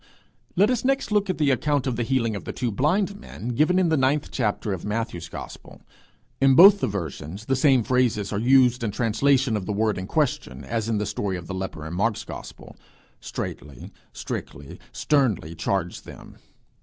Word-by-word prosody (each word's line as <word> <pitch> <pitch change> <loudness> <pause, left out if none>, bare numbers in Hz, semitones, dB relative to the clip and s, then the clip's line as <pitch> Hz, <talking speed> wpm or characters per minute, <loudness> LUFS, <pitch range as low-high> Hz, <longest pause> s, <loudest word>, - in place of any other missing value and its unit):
Let 205 +7 +4
us 250 - -1
next 270 -3 0
look 205 -2 +1
at 185 - -1
the 150 -3 +2
account 145 +1 0
of 130 -3 -1
the 120 - -2
healing 115 -2 0
of 100 - -6
the - - -5
two 120 -2 -2
blind 190 - 0
men, 125 - -8
given 155 +9 +2
in 185 -2 +3
the 160 - +3
ninth 140 +2 +1
chapter 105 -4 -1
of 90 - -6
Matthew's 105 -6 -3
gospel. - - -10 0.6
In 135 -1 +5
both 200 +6 +9
the - - 0
versions 90 0 -6
the 135 - +1
same 130 -2 +4
phrases 115 -5 0
are 100 - -1
used 125 0 +4
in 110 - 0
translation 125 +3 +1
of 100 -3 -4
the 105 - -1
word 105 -1 0
in 95 - -6
question, 125 - -1
as 110 +11 -3
in 110 - +1
the 105 - -1
story 95 -3 -3
of 85 - -9
the 95 - -6
leper 95 -4 -5
in 80 - -6
Mark's 105 +4 0
gospel - - -10 0.4
'straitly,' 70 -4 -7 0.2
'strictly,' 70 +1 -7
'sternly 120 - 0
charged 90 +1 -2
them.' - - -13
115 Hz, 195 wpm, -24 LUFS, 100-140 Hz, 0.6 s, both